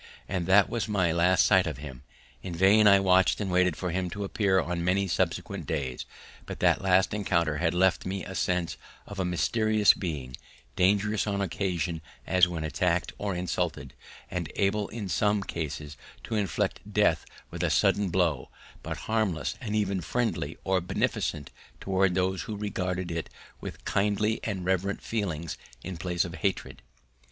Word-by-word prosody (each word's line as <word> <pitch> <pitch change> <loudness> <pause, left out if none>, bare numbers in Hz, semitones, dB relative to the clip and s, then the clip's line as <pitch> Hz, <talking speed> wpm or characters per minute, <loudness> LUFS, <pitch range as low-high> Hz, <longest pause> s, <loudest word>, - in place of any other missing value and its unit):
And 90 -3 -2
that 100 +1 +6
was 115 -1 -2
my 95 -6 +1
last 90 +2 +4
sight 95 -3 +4
of 75 -6 -4
him; 65 -4 -9 0.4
in 85 - -6
vain 100 +4 +5
I 100 -1 +7
watched 95 -1 +3
and 100 -3 -2
waited 90 -2 +3
for 90 -2 -3
him 90 +1 -1
to 100 +2 -5
appear 100 -1 +2
on 85 -1 -2
many 95 +2 +1
subsequent - - -2
days: 65 -5 -3 0.4
but - - -6
that - - +3
last 95 0 +3
encounter 85 -7 +1
had 80 +1 0
left 95 +1 +3
in - - -4
me 95 0 -4
a 95 - -7
sense 90 -2 -1 0.3
of 100 - -8
a 95 - +1
mysterious 110 +4 +3
being, 70 -9 -5 0.4
dangerous 105 +3 +2
on 100 -1 -1
occasion 90 -4 -2 0.2
as 90 -1 +4
when 85 -3 -4
attacked 85 +3 0
or 100 -2 -2
insulted, 90 0 -2 0.4
and - - -3
able 100 +1 +1
in 110 -3 -6
some 100 +5 +1
cases 75 -4 -5 0.3
to - - -6
inflict 100 -7 0
death - - +3 0.3
with - - -5
a - - +2
sudden 100 -2 +2
blow, 85 -6 0 0.3
but - - -5
harmless 110 -8 0
and 105 -4 -3
even 100 -3 0
friendly 100 -5 -2
or 95 -1 +1
beneficent 75 -4 -2 0.3
towards 95 -1 +1
those 95 0 0
who 105 - -5
regarded 90 -3 -3
it 85 -1 -4 0.3
with - - -8
kindly 105 +2 +1
and 95 -5 -3
reverent 95 +2 0
feelings 85 -8 -3 0.2
in 95 - -5
place 85 +1 -1
of 85 - -7
hatred. 95 +2 -2
95 Hz, 170 wpm, -28 LUFS, 85-100 Hz, 0.4 s, I